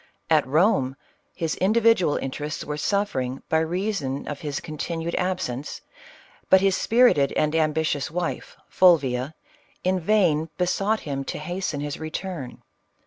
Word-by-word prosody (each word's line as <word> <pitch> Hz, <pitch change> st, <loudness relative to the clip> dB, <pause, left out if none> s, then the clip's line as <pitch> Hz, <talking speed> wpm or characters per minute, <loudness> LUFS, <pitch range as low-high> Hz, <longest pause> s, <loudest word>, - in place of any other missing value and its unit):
At 155 Hz, -4 st, +4 dB
Rome, 140 Hz, -3 st, +2 dB, 0.4 s
his 165 Hz, -3 st, -2 dB
individual 215 Hz, -5 st, +3 dB
interests 150 Hz, +3 st, -4 dB
were 150 Hz, -, -3 dB
suffering 150 Hz, -7 st, -1 dB
by 160 Hz, -, +3 dB
reason 160 Hz, -5 st, -2 dB
of 145 Hz, -, -5 dB
his 145 Hz, -3 st, -3 dB
continued 165 Hz, +1 st, -4 dB
absence, 180 Hz, -8 st, -2 dB, 0.7 s
but 190 Hz, -, +7 dB
his 195 Hz, 0 st, +2 dB
spirited 225 Hz, -, +4 dB
and 150 Hz, 0 st, +1 dB
ambitious 155 Hz, -2 st, 0 dB
wife, 175 Hz, +1 st, -4 dB
Fulvia, 145 Hz, -5 st, +3 dB, 0.5 s
in 185 Hz, 0 st, +1 dB
vain 170 Hz, -5 st, +2 dB
besought 195 Hz, +4 st, 0 dB
him 135 Hz, -2 st, -4 dB
to -, -, -4 dB
hasten 170 Hz, -2 st, -3 dB
his 145 Hz, 0 st, -4 dB
return. 155 Hz, -3 st, -6 dB
160 Hz, 130 wpm, -24 LUFS, 145-185 Hz, 0.7 s, but